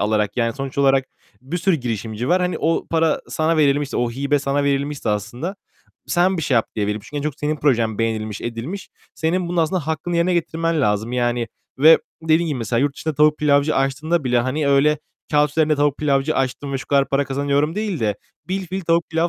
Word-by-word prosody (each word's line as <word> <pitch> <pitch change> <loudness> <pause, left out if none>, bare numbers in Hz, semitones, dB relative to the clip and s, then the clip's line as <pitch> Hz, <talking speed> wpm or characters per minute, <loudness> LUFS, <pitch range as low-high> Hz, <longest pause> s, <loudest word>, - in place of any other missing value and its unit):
alarak. 105 -1 0
Yani 115 -2 +1
sonuç 135 0 -6
olarak 135 -1 +4 0.4
bir 135 +8 -4
sürü 180 0 +2
girişimci 115 -2 -4
var. 180 +1 +3
Hani, 180 0 0
o 165 +1 0
para 165 -1 +2
sana 160 +1 +1
verilmişti, 145 -1 +2
o 120 -1 0
hibe 140 +4 0
sana 140 +1 0
verilmişse 140 -2 -1
aslında, 120 - -3 0.5
sen 185 +2 +2
bir 165 - -2
şey 135 - +1
yap, 115 - +3
diye 105 -2 0
verilmiş. 105 +5 -4
En 145 - -3
çok 150 -2 -2
senin 150 +1 0
projen 115 -7 +1
beğenilmiş, 110 -2 -2
edilmiş. 120 +12 -5 0.3
Senin 170 +2 -1
bunun 175 - -3
aslında 165 -1 0
hakkını 165 +2 -2
yerine 175 +1 +2
getirmen 165 -1 0
lazım, 105 +1 0
yani, 120 -2 0 0.3
ve 160 +3 +8 0.2
dediğin 160 +1 +2
gibi 145 - -2
mesela 115 +1 0
yurt 140 0 +1
dışında 160 -1 -3
tavuk 150 +1 +4
pilavcı 145 0 +2
açtığında 140 +4 0
bile, 125 -1 +2
hani 140 +4 -1
öyle 140 +2 +4 0.3
kâğıt 150 -1 +3
üzerinde 155 0 +2
tavuk 145 -1 +2
pilavcı 145 0 +1
açtım 135 +1 -2
ve 135 - -1
şu - - -9
kadar 140 -1 +2
para 140 +1 +1
kazanıyorum 140 +3 0
değil 210 -5 -2
de, 105 -2 0 0.3
bilfiil 190 0 -3
tavuk 170 -1 +1
pilav 165 +1 +1
145 Hz, 200 wpm, -21 LUFS, 125-160 Hz, 0.5 s, ve